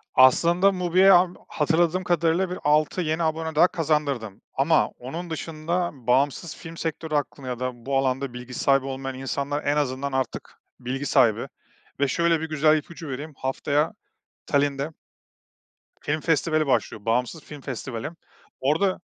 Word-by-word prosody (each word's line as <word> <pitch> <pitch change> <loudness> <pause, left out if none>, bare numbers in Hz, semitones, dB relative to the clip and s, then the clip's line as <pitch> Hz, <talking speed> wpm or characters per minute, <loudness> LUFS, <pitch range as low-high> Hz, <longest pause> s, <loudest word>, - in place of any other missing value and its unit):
Aslında 170 +9 +5
MUBI'ye 185 +1 +4
am 180 0 +5
hatırladığım 170 +4 +1
kadarıyla 175 +1 +1
bir 180 - -5
6 150 +4 +2
yeni 160 0 0
abone 160 0 -1
daha 165 +4 +6
kazandırdım 145 - -1
ama 150 +4 +3
onun 165 +8 -7
dışında 165 +2 -2
bağımsız 135 +5 0
film 165 -1 -10
sektörü 160 -1 -3
hakkında 140 -2 -2
ya 125 -1 -4
da 130 0 -1
bu 135 0 +1
alanda 135 -1 0
bilgi 125 +1 -8
sahibi 135 +1 +2
olmayan 135 0 -4
insanlar 140 +2 -2
en 145 +1 +1
azından 140 -1 -1
artık 130 -3 -3 0.2
bilgi 130 +3 -4
sahibi 125 -7 +3 0.5
ve 140 - +3
şöyle 170 +3 +2
bir 160 - -4
güzel 155 0 +4
ipucu 160 +1 -8
vereyim. 145 +4 -6
Haftaya 145 +5 0 0.5
Talin'de 140 0 +1 1.1
film 155 +2 -1
festivali 155 0 +1
başlıyor. 110 -5 0
Bağımsız 125 +7 0
film 150 -2 -10
festivali. 125 0 -5 0.5
Orada 160 +8 +1
150 Hz, 145 wpm, -25 LUFS, 135-165 Hz, 1.1 s, daha